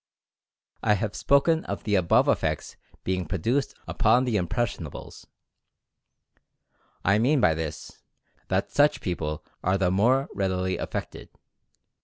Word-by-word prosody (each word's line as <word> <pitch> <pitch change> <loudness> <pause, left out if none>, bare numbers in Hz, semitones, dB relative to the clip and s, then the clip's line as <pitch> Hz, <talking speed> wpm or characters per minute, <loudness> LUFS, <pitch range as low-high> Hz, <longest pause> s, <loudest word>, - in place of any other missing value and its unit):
I 105 - +3
have 105 +1 -3
spoken 160 +3 +3
of 100 - -5
the 105 - -2
above 90 -4 +3
effects - - -1 0.3
being 90 -2 -2
produced 115 - -1
upon 125 +1 +3
the 120 -3 -1
"irnpressiondbles." 100 - -3 1.8
I 100 +2 +4
mean 135 +6 +3
by 90 -9 +4
this, 80 -1 -6 0.5
that - - -1
such 150 +1 +3
people 75 -5 -4 0.2
are 95 +2 +2
the 90 -2 +1
more 125 +8 +3
readily 95 -1 -1
affected. - - -5
100 Hz, 120 wpm, -26 LUFS, 90-125 Hz, 1.8 s, I